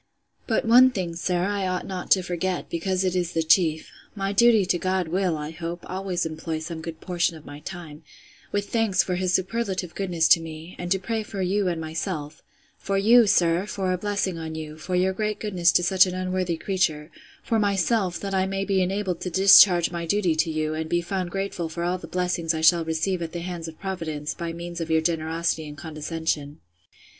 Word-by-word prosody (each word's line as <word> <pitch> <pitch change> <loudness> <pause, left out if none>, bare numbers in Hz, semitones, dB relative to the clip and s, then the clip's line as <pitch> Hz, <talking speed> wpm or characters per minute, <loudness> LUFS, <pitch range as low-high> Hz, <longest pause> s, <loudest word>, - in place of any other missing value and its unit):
But 225 - +1
one 250 +3 +7
thing, 180 -8 -4
sir, 175 +1 -1
I 200 0 -1
ought 185 0 -2
not 185 -2 -6
to 185 - +5
forget, 180 +1 -3
because 185 +3 -1
it 185 -1 0
is 175 -2 -1
the 165 - +1
chief: 160 -1 +2 0.2
My 195 -1 -2
duty 225 -1 +5
to 175 -1 0
God 185 -2 -1
will, 180 -2 0
I 150 +1 -5
hope, 170 +1 -6
always 185 -2 -2
employ 160 0 -4
some 160 +1 -6
good 160 0 -7
portion 175 -2 -1
of 155 - -16
my 145 0 -9
time, 160 -2 -9 0.5
with 205 0 -2
thanks 225 -5 +2
for 185 - -3
his 180 0 0
superlative 190 -2 -1
goodness 175 -4 0
to - - +7
me; 165 +2 -9
and 175 0 -5
to 195 - +4
pray 220 +4 -3
for 200 -2 -4
you 195 +2 +1
and 170 -2 -1
myself: 160 -1 -5 0.4
for 195 0 -1
you, 225 +3 +6
sir, 175 +1 +2
for 190 -3 -1
a - - -1
blessing 195 -3 -2
on 160 -1 -6
you, 155 -1 -6
for 175 +4 -4
your 185 +1 +2
great 210 +1 -2
goodness 180 -5 +2
to 175 - +3
such 185 +2 +5
an 180 - -4
unworthy 185 -2 -1
creature: 165 -5 -1 0.3
for 225 - 0
myself, 200 -2 +1
that 195 -1 -4
I 190 0 +1
may 195 0 -2
be 195 -1 +1
enabled 185 -1 -1
to 180 - -3
discharge 190 -1 +7
my 170 -1 -4
duty 185 -2 +2
to 160 +1 +1
you, 155 0 -1
and 160 0 -4
be 175 +1 +1
found 185 0 -3
grateful 195 -3 -3
for 170 +2 -4
all 180 +1 -1
the - - -9
blessings 180 -2 -1
I 160 - -3
shall 165 +1 +5
receive 160 +3 -1
at 165 -1 -5
the 170 - -4
hands 170 -2 -5
of 160 - -10
Providence, 160 -6 -4
by 170 -1 -5
means 170 0 -6
of 165 - -4
your 160 0 +3
generosity 160 -1 -1
and 145 0 -9
condescension. 155 -1 -4
180 Hz, 215 wpm, -25 LUFS, 165-190 Hz, 0.5 s, one